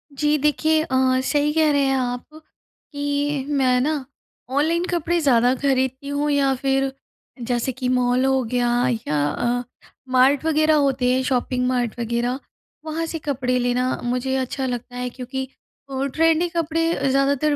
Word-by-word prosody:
जी 300 +1 +2
देखिए, 310 +2 +2
अ, 260 -2 +2
सही 295 0 +2
कह 315 -1 +3
रहे 285 -1 +2
हैं 270 0 +2
आप, 245 -1 -2 0.7
कि 285 -1 -1
मैं 260 -3 +2
ना 295 -1 -1 0.5
ऑनलाइन 330 +4 +1
कपड़े 345 0 0
ज़्यादा 250 -4 +4
खरीदती 265 0 -1
हूँ 285 +1 -1
या 275 -1 +2
फिर 270 +1 0 0.6
जैसे 245 +1 0
कि 255 0 -3
मॉल 250 0 +2
हो 265 0 +2
गया 245 +1 0 0.4
या 150 - 0
अ, 245 +8 -1 0.5
मार्ट 260 +3 +3
वगैरह 310 0 +3
होते 270 -4 +2
हैं 260 - +1
शॉपिंग 250 -1 0
मार्ट 245 -2 -1
वगैरह। 240 +2 -1 0.5
वहाँ 320 +1 -2
से 325 0 -5
कपड़े 255 -4 -1
लेना 250 +1 0
मुझे 250 +2 -1
अच्छा 265 +1 -2
लगता 245 0 -5
है। 250 0 -3
क्योंकि 260 +2 -5 0.4
अ, 270 0 -2
ट्रेंडी 325 +1 +3
कपड़े 330 -2 0
ज़्यादातर 280 +2 +2
270 Hz, 155 wpm, -22 LUFS, 250-295 Hz, 0.7 s, ज़्यादा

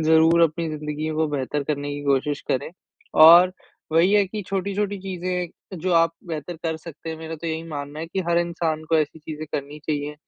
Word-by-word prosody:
ज़रूर 160 +1 +5
अपनी 165 0 +1
ज़िन्दगी 150 0 -4
को 160 0 +1
बेहतर 145 0 -2
करने 145 0 -2
की 145 - -6
कोशिश 140 +1 +1
करें। 130 - -1 0.4
और 170 +4 +9 0.4
वही 170 +5 +4
है 205 -1 +5
कि 210 +2 -5
छोटी-छोटी 200 +1 -1
चीज़ें 180 -1 -5
जो 180 +3 -1
आप 165 0 +4
बेहतर 165 +1 -5
कर 160 -1 -1
सकते 160 0 -9
हैं 160 - -5
मेरा 160 0 -6
तो 165 - -7
यही 160 0 -2
मानना 145 0 -6
है 165 - -4
कि 190 +3 -3
हर 170 0 +3
इंसान 165 -2 -1
को 160 - +6
ऐसी 155 +1 -1
चीज़ें 155 0 -7
करनी 145 +1 -4
चाहिए, 150 -1 -2
160 Hz, 200 wpm, -23 LUFS, 150-175 Hz, 0.4 s, और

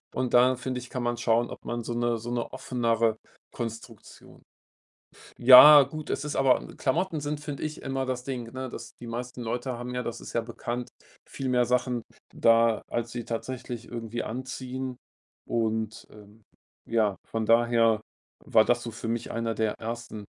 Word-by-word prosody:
Und 130 -1 -1
da, 125 +1 +6
finde 125 0 -4
ich, 125 0 -11
kann 125 - -4
man 120 0 -1
schauen, 115 0 +1
ob - - -9
man 120 0 -3
so 120 - -4
'ne 120 0 0
so 115 +2 -6
'ne 120 -1 -2
offenere 115 -4 0 0.4
Konstruktion 115 -2 -8 1.0
ja, 135 +4 +11
gut, 155 +2 -8
es - - -2
ist 150 - -3
aber 135 -2 +3
Klamotten 160 +3 0
sind, 145 0 -3
finde 145 -2 -6
ich, 155 0 -5
immer 135 -1 -2
das 125 -1 -3
Ding, 125 -4 -5
ne 130 0 -5
dass - - -9
die 120 - -8
meisten 120 +1 -5
Leute 120 +2 -3
haben 125 +1 -6
ja, 125 - -1
das 120 -1 -5
ist - - -9
ja 115 - +2
bekannt, 120 +1 -5 0.4
viel 135 - -4
mehr 125 -1 +3
Sachen 125 -1 0 0.3
da, 115 -1 +4
als 120 0 -2
sie 120 -1 -5
tatsächlich 120 0 -5
irgendwie 115 0 -4
anziehen 130 +1 -5 0.5
und 110 -1 -2 0.8
ja, 110 -4 +1
von 115 -1 -2
daher 115 -1 +4 0.5
war 110 -1 +5
das 120 +1 +1
so 120 - -5
für 115 - -6
mich 115 0 -2
einer 115 0 -1
der 110 -1 0
ersten 115 -2 -6
120 Hz, 175 wpm, -27 LUFS, 115-130 Hz, 1.0 s, ja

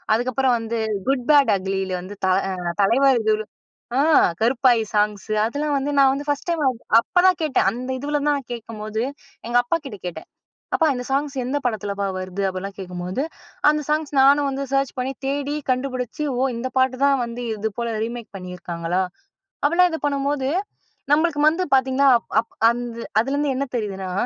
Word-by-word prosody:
அதுக்கப்புறம் 255 +1 +1
வந்து 225 0 -3 0.3
Good 270 -2 +2
Bad 285 -2 +6
Ugly 190 +1 -2 0.2
வந்து 200 +3 -9
த - - +2 0.2
அ - - -2 0.3
தலைவா 270 +7 +4 0.9
ஆ, - - +3 0.4
கருப்பாயி 240 0 +3
சாங்ஸு 210 0 0
அதெல்லாம் 290 +4 -1
வந்து 285 +2 -2
நான் 270 -1 +6
வந்து 285 - -5
ஃபர்ஸ்ட் 290 +4 -2
டைம் 335 -2 0 0.4
அப்பதான் 360 +3 +3
கேட்டேன். 295 -9 +2
அந்த 250 +3 -6
இதுவுல 295 +2 -1
தான் 295 - +3
நான் 260 -3 -9
கேட்கும்போது 220 -1 -5 0.5
எங்க 240 +1 +2
அப்பாகிட்ட 270 -5 -3
கேட்டேன். 160 -2 -7 0.5
அப்பா 325 - +3
இந்த 250 0 -4
சாங்ஸ் 280 +1 0
எந்த 280 +3 -1
படத்துலப்பா 205 -4 -2
வருது? 185 +1 -4
அப்பிடிலாம் 190 +1 -5
கேட்கும்போது, 180 +5 -4 0.5
அந்த 300 0 +2
சாங்ஸ் 305 0 0
நானும் 280 +1 +5
வந்து 275 +1 -3
சர்ச் 275 -1 +1
பண்ணி 260 +2 -1
தேடி 285 +1 -1 0.2
கண்டுபிடிச்சு, 255 +2 -2
ஓ! - - 0 0.2
இந்த 255 +2 -3
பாட்டு 260 0 +3
தான் 280 -1 +4
வந்து 235 +1 -6
இது 215 +1 -2
போல 235 -1 -2
ரீமேக் 235 -1 -6
பண்ணியிருக்காங்களா! 180 -1 -3 0.6
அப்பிடிலாம் 345 +5 +4
இதை 320 - -2
பண்ணும்போது, 280 -1 0 0.6
நம்மளுக்கு 305 -1 +2
வந்து 340 +4 0
பார்த்தீங்கன்னா, 265 +1 +3 0.3
அப் 230 - -15 0.2
அந் 240 +1 -2 0.4
அதுலருந்து 280 +3 0
என்ன 275 +1 -1
தெரியுதுன்னா, 195 -4 -4
255 Hz, 160 wpm, -22 LUFS, 215-285 Hz, 0.9 s, Bad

